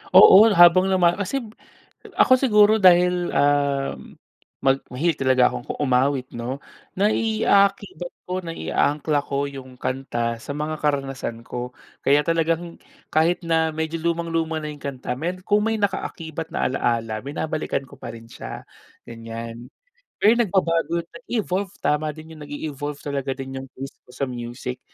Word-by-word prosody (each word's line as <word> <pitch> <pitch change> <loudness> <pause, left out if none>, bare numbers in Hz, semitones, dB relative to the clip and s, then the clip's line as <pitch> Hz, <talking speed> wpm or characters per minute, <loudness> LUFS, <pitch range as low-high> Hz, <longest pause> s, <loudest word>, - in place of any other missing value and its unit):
Oo, 195 +2 +10
habang 175 +1 +7
lumal 175 -2 +3
kasib 225 +2 -3 0.7
ako - - +5
siguro 215 -5 +5
dahil, 180 -1 +5
um, 140 - 0 0.4
mag 135 0 +3
mahilig 155 +5 0
talaga 130 -1 +4
akong 120 - -6
ku - - -4
umawit 130 0 +2
'no. 125 +4 -5 0.3
Nai-aakibat 200 -3 +1
ko, 180 +1 -2
nai-aangkla 150 -2 0
ko 140 0 -2
yung 130 -2 -10
kanta 120 -3 -3
sa 140 +5 -7
mga 150 +1 -3
karanasan 135 -5 -2
ko. 125 +1 -6 0.3
Kaya 145 +2 +5
talagang 165 +1 -1 0.3
kahit 165 +3 +2
na 160 -1 +1
medyo 160 +1 -2
lumang-luma 165 -1 -1
na 150 - -4
yung 145 -1 -11
kanta 130 -2 -4
may 170 +5 -2
kung 210 +2 +2
may 225 0 0
naka-akibat 165 -5 -3
na - - 0
alaala, 115 -4 -1
binabalikan 155 0 -2
ko 140 +1 -16
pa - - -7
rin 115 0 -13
siya, - - -8 0.4
ganyan. 115 +1 -8 0.5
Pero 225 +3 +5
nagbabago, 170 -5 +1
na-evolve, 205 -6 -3
tama 150 +1 +1
din 160 +1 -11
yung 155 - -13
nag-e-evolve 145 0 -5
talaga 140 -2 -3
din 135 0 -6
yung 135 - -9
taste 135 +1 -8
ko - - -15
sa 140 - -3
music. 125 0 -5
150 Hz, 145 wpm, -23 LUFS, 135-175 Hz, 0.7 s, Oo